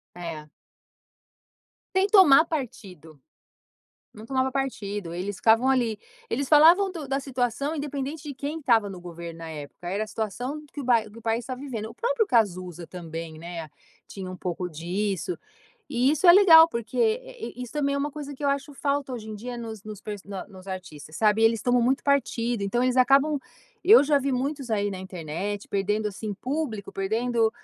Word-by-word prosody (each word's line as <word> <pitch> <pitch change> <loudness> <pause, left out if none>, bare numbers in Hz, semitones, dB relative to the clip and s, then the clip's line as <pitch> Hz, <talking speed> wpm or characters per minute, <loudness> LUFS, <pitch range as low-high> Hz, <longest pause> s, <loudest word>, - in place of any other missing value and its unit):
É. 165 -3 -7 1.5
Sem 380 +1 +4
tomar 375 -9 +7
partido. 190 - -6 0.9
Não 215 +1 -11
tomava 260 +1 0
partido. 205 -9 -3
Eles 190 +3 -4
ficavam 225 +5 +4
ali. 245 -5 +2 0.3
Eles 270 +3 -2
falavam 335 +6 +7
do 330 -6 -7
da 270 +1 -1
situação, 270 +3 -2
independente 285 +1 -4
de 285 - -5
quem 290 +4 -4
estava 230 -8 +2
no 185 -2 -8
governo 170 -1 -8
na 165 0 -7
época, 155 +2 -9
era 200 +4 -1
a - - -3
situação 245 +8 -4
que 290 - -6
o - - -5
bai 235 -3 +3
que 210 - -16
o 230 - -11
país 225 +1 -1
estava 255 -1 -6
vivendo. 240 -6 -5
O 225 - -12
próprio 475 - 0
Cazuza 185 - 0
também, 165 -2 -7
né? 165 -1 -7 0.4
Tinha 190 -2 -7
um 185 - -7
pouco 180 0 -3
disso 185 - -3 0.5
e 250 +3 +2
isso 315 +4 +1
é 345 - +11
legal, 335 -4 +9
porque 235 -7 -5
e 485 +1 0
e - - -14
e - - -3
isso 245 - -8
também 280 -2 0
é - - 0
uma 290 +1 -1
coisa 290 -1 -7
que 285 - -7
eu - - +3
acho 280 +1 -1
falta 280 -1 -1
hoje 225 -3 -6
em 215 - -5
dia 240 +4 -6
nos 225 -3 -7
nos 215 -2 -8
per 210 -1 -6
na 195 -2 -6
nos 190 -1 -14
artistas, 160 -5 -8
sabe, 215 0 +3
eles 225 -1 +3
tomam 245 0 +3
muito 260 +3 +1
partido. 245 -5 0
Então 240 +5 0
eles 255 0 +1
acabam 275 +4 +4 0.5
Eu 420 +2 +8
já 290 0 +3
vi 275 0 -1
muitos 270 0 -2
aí 205 -2 +1
na 190 - -5
internet, 185 +2 -5
perdendo 205 +2 0
assim 205 +1 -5
público, 250 -4 -4
perdendo, 225 +3 +1
230 Hz, 190 wpm, -26 LUFS, 195-280 Hz, 1.5 s, é